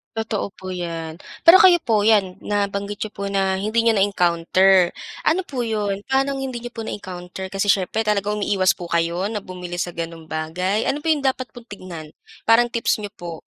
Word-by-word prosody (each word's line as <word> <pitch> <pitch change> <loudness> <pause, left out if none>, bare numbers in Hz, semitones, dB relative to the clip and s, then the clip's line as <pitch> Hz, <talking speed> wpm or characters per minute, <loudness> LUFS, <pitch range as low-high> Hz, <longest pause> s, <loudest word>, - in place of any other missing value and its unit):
Totoo 220 -3 -3
po 185 - -9
'yan. 165 -3 -5 0.2
Pero 335 +3 +9
kayo 350 -3 +6
po, 215 -6 +1
'yan 200 -4 +3
nabanggit 200 0 -2
niyo 215 - -2
po 200 -1 -6
na 190 -1 +1
hindi 215 +4 +1
niyo 230 -2 +3
na-encounter. 185 -1 +3 0.3
Ano 355 +4 +3
po 260 -9 -4
'yon, 205 -2 -2
paanong 270 +1 +1
hindi 260 -3 -4
niyo 240 - -6
po 225 -1 -6
na-encounter? 185 -1 -7
Kasi 195 +1 -1
siyempre, 205 +2 +1
talagang 210 0 0
umiiwas 195 -2 +2
po 175 - -7
kayo 170 +2 0
na 210 0 -3
bumili 180 -2 -8
sa - - -2
gano'ng 165 -1 -7
bagay? 180 +7 -1
Ano 290 - -1
po 325 - -2
yung 295 -3 +1
dapat 260 -1 0
pong 240 -2 -13
tignan? 175 -7 -9 0.3
Parang 235 +2 +5
tips 235 -2 0
niyo 205 - -5
po 170 -2 -7
200 Hz, 190 wpm, -22 LUFS, 180-225 Hz, 0.3 s, Pero